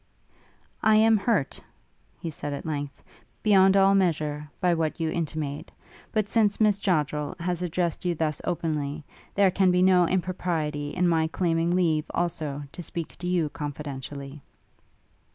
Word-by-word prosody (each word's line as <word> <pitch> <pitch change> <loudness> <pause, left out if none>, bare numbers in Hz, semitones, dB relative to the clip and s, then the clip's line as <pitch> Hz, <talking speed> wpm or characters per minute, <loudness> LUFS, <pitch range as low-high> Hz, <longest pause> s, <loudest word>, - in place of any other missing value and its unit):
'I 220 0 +5
am 220 +1 +5
hurt,' 200 - 0 0.6
he 165 -2 -5
at 145 -1 -4
length 145 -3 -3
said, - - -29 0.4
'beyond 195 -2 +5
all 195 0 +5
measure, 150 -6 0
by 180 -1 +3
what 160 -1 -1
you 160 -1 0
intimate; 155 -3 -4 0.4
but 215 -2 0
since 215 -2 +2
Miss 210 -2 +3
Joddrel 150 -6 0
has 175 0 -2
addressed 175 -1 -1
you 175 -1 0
thus 155 -2 -1
openly, 155 -3 -2 0.3
there 200 -2 +4
can 190 0 +3
be 180 0 +3
no 180 -2 +5
impropriety 165 -5 -1
in 180 +3 +1
my 160 -2 +2
claiming 170 0 0
leave, 160 -4 +2
also, 155 -4 -2
to 175 - -7
speak 170 -1 -5
to 175 - -5
you 175 -4 +1
confidentially.' 145 -1 -6
165 Hz, 150 wpm, -26 LUFS, 150-185 Hz, 0.6 s, I